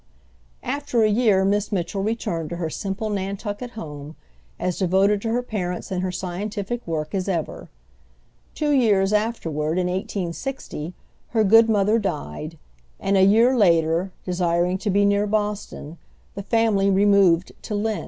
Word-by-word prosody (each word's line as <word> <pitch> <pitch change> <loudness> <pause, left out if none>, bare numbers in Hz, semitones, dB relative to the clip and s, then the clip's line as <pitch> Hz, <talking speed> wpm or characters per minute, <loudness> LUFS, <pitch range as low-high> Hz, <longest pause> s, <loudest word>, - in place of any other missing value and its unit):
After 275 -5 0
a - - +5
year, 210 -3 +3
Miss 205 +2 0
Mitchell 195 0 -2
returned 195 -7 -2
to 170 - -4
her 165 -2 -3
simple 205 +5 -3
Nantucket 205 +4 -4
home, 150 -4 -8 0.4
as 180 - -2
devoted 195 +2 +2
to 225 - -2
her 245 +2 0
parents 180 -7 -4
and 180 -1 -1
her 185 0 -2
scientific 200 +5 -4
work 155 -2 -3
as 195 0 -1
ever. 170 -5 -3 0.9
Two 300 -1 0
years 210 -7 +3
afterward, 165 -8 -1
in 180 - +1
1860, 180 - -4 0.3
her 225 -2 +1
good 225 +3 +6
mother 210 +1 +3
died, 155 - -4 0.4
and 200 - 0
a 190 - +5
year 225 +7 +5
later, 170 -3 +3
desiring 180 0 0
to 205 - -2
be 200 +1 +3
near 200 +1 +2
Boston, 205 -6 -3 0.3
the 200 - -5
family 210 -2 +2
removed 195 -3 +4
to 210 - -4
Lynn. 215 +1 -1
195 Hz, 150 wpm, -23 LUFS, 175-215 Hz, 0.9 s, good